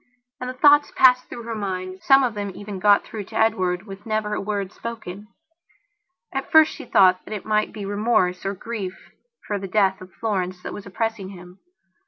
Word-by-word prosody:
And 250 - -4
the 255 - -6
thoughts 290 +2 +5
passed 255 -1 +5
through 235 - -7
her 230 0 -5
mind; 185 -3 -4
some 270 0 +5
of 245 -3 0
them 205 -2 -4
even 205 -2 -7
got 205 +1 +5
through 210 -3 -7
to - - -13
Edward 185 -5 +1
with 195 -1 -10
never 215 -1 -2
a - - -2
word 200 -2 -3
spoken. 215 -4 -8 1.1
At 270 0 -4
first 315 -1 +6
she - - -9
thought 185 -1 +4
that 215 - -6
it 200 - -7
might 215 0 +1
be 205 -2 -7
remorse, 200 -3 +1
or 195 +1 -2
grief, 195 -3 -5 0.5
for 205 -1 -2
the 195 - -6
death 190 -1 +2
of 185 0 -11
Florence 185 -5 -2
that - - -6
was 200 - -8
oppressing 220 0 -3
him. 180 -1 -13
205 Hz, 200 wpm, -23 LUFS, 190-225 Hz, 1.1 s, first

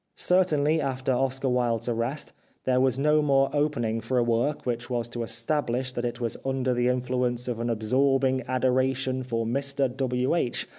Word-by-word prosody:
Certainly 160 -4 +2
after 130 -1 -1
Oscar 135 +1 0
Wilde's 120 -2 0
arrest 120 +5 -2 0.3
there 130 0 +2
was 130 -1 +2
no 150 +2 +3
more 135 -2 +3
opening 135 -7 0
for 125 +4 -1
a 120 - +4
work 120 +5 0
which 120 0 -3
was 120 -2 -1
to 120 0 -5
establish 120 +2 -1
that 120 -1 -3
it 120 - -3
was 115 -2 -3
under 130 -1 0
the 120 0 +1
influence 125 -1 0
of 120 -2 -3
an 120 0 -1
absorbing 130 +4 +2
adoration 130 +1 +1
for 115 -3 -2
Mr 135 +1 0
W. 130 0 0
H. 165 -8 -1
130 Hz, 170 wpm, -26 LUFS, 120-135 Hz, 0.3 s, a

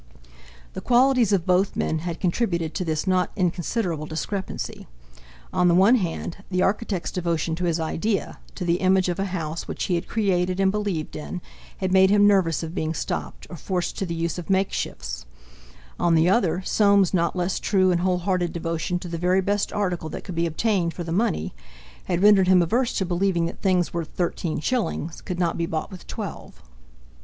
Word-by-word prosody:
The - - -6
qualities 250 -3 +4
of 185 -4 +2
both 185 +2 +2
men 160 - 0
had 170 0 -5
contributed 170 -4 0
to 185 - -2
this 155 -3 -1
not 185 -1 +2
inconsiderable 175 -2 -1
discrepancy. 190 +5 -4 0.7
On 180 - +3
the 170 - +4
one 195 +6 +6
hand, 175 -6 -1
the 185 -1 +1
architect's 200 -3 -1
devotion 170 -2 -1
to 180 - -2
his 170 -1 0
idea, 190 +6 -2 0.2
to 180 - -4
the 170 0 +2
image 185 -1 +3
of 175 - -2
a 195 - 0
house 165 -4 -4
which - - -4
he 185 - 0
had 170 +1 -1
created 185 -4 0
and 190 -1 +3
believed 200 -7 -3
in—had 185 +3 -6
made 190 0 +6
him 205 0 +5
nervous 185 -6 +3
of 165 0 -5
being 160 -3 -2
stopped, - - -4
or 175 - -8
forced 180 +2 -2
to 195 - -2
the 170 - -3
use 165 +1 -2
of 175 - -9
makeshifts; 125 - -2 0.7
on 170 -1 +3
the 160 +1 +4
other, 185 -3 +2
Soames's 200 -2 +3
not 170 -1 +1
less 180 +1 -1
true 185 -2 +2
and 175 -1 +1
wholehearted 180 -1 0
devotion 165 +1 -2
to 175 - -7
the 170 -1 -4
very 180 +2 +3
best 200 +2 0
article 180 -6 -2
that - - -7
could 185 - -7
be 170 0 0
obtained 170 0 0
for 175 - -4
the 165 - -5
money, 170 - 0 0.5
had 175 +1 0
rendered 205 -3 +6
him 185 -1 +6
averse 235 +8 +1
to 190 - 0
believing 175 -1 +1
that 170 - -6
things 185 -3 +1
worth 170 -2 -3
thirteen 170 -2 -1
shillings 175 - -2
could 180 - -5
not 175 -2 0
be 170 - 0
bought 160 +5 -3
with 185 - -11
twelve. - - -7
180 Hz, 190 wpm, -24 LUFS, 170-195 Hz, 0.7 s, one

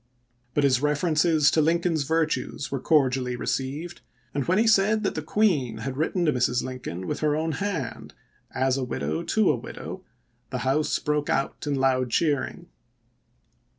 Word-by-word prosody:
But 145 - +2
his 135 -2 +3
references 155 +1 +3
to 160 - +3
Lincoln's 165 -1 +1
virtues 160 -2 -1
were 135 - -1
cor 150 -1 +4
dially 125 -1 -2
received, 140 +8 -3 0.3
and 140 - 0
when 185 +2 +3
he 225 - +4
said 215 0 +3
that 195 - 0
the 155 - -3
Queen 155 - +1
had 130 +4 -4
written 170 +4 0
to 150 - +3
Mrs. 125 0 +1
Lincoln 125 -9 -6
with - - -3
her 150 -1 +1
own 160 +1 -1
hand, 165 - -4 0.2
" - - -40
as 130 0 +1
a 135 - -1
widow 80 - -2
to - - +2
a - - 0
widow," - - -8 0.5
the - - -4
House 145 +4 +1
broke 150 -1 -1
out 135 +2 -1
in 145 - +1
loud 130 -2 +1
cheering. 145 +2 0
145 Hz, 175 wpm, -25 LUFS, 130-165 Hz, 0.5 s, cor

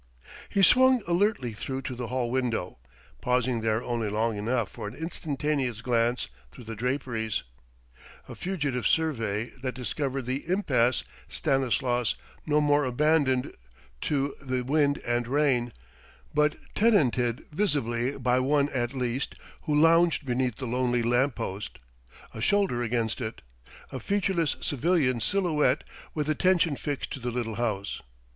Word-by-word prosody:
He 195 - +2
swung 255 +2 +6
alertly 175 - +1
through 130 +5 -5
to 130 - -4
the 120 -1 -5
hall 125 0 -1
window, 120 - -1 0.4
pausing 125 -1 +1
there 110 +1 0
only 115 -3 -1
long 110 +2 0
enough 115 +1 -1
for 115 -5 -6
an 105 - -8
instantaneous 145 -6 -2
glance 120 - +1 0.2
through 125 - -12
the 115 0 -6
draperies 115 -2 -2 0.8
a - - -8
fugitive 145 - -1
survey 115 -9 0
that 130 -1 -3
discovered 130 +2 -3
the 130 +5 -3
impasse 130 - +2 0.3
Stanislas 125 -3 +1 0.3
no 150 0 +3
more 145 0 +3
abandoned 130 0 +2 0.5
to 140 -1 0
the 130 -2 -2
wind 145 +2 +2
and 120 0 0
rain, 130 -3 +2 0.6
but 150 0 +3 0.2
tenanted 130 - +2
visibly 140 - 0
by 125 -1 +2
one 140 +2 +2
at 120 -1 -2
least 125 +1 -2 0.3
who 150 -2 +2
lounged 165 0 +4
beneath 125 -2 0
the 130 - -6
lonely 125 0 +1
lamp 120 +3 +2
post, 105 -2 -5 0.6
a 110 - -6
shoulder 195 - +2
against 115 0 -1
it: 110 -2 -5 0.5
a 130 - -4
featureless 180 - 0
civilian 145 -3 +1
silhouette 150 - +2 0.3
with 150 -2 -1
attention 165 0 +3
fixed 145 0 -4
to - - -5
the 125 0 -3
little 115 -3 -3
house. 105 -5 -2
130 Hz, 140 wpm, -27 LUFS, 120-150 Hz, 0.8 s, swung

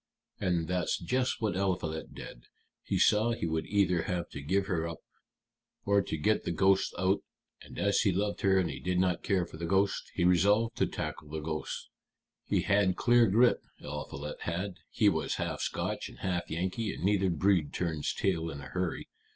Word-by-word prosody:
And 85 -3 0
that's 90 -1 0
just 125 +9 -1
what 105 -4 +1
Eliphalet 90 -5 -2
did. - - -10 0.4
He - - -1
saw 110 +3 +4
he 115 - -3
would 80 -1 -1
either 95 -4 +2
have 85 +1 -3
to 70 - -7
give 95 +7 +1
her 85 -4 -1
up 85 -1 -6 0.9
or 100 0 +4
to 80 - -4
get 105 +8 +1
the - - -3
ghosts 95 +3 +3
out; 95 +2 +2 0.4
and - - -12
as 100 0 +2
he 100 - +3
loved 100 +3 -1
her 95 -1 +4
and 90 -4 +1
did 90 +1 0
not 90 -1 +2
care 95 -4 +1
for 80 - -11
the 85 +1 -4
ghosts, 95 +3 +1
he 90 - +1
resolved 100 +6 +3
to - - +2
tackle 75 -2 -5
the 80 +1 -4
ghosts. 75 0 -4 0.6
He - - +2
had 100 -2 +2
clear 120 -1 +4
grit, 115 +5 +4 0.2
Eliphalet 75 +2 -6
had 90 +3 -3
he - - +2
was - - +1
half - - -3
Scotch - - -2
and - - -14
half 90 -2 -2
Yankee 95 +6 -2
and - - -8
neither 95 -1 +3
breed 85 -2 +2
turns 80 -4 -1
tail 85 -4 0
in 70 - -6
a 70 -2 -9
hurry. 90 +2 -3
90 Hz, 190 wpm, -30 LUFS, 85-100 Hz, 0.9 s, saw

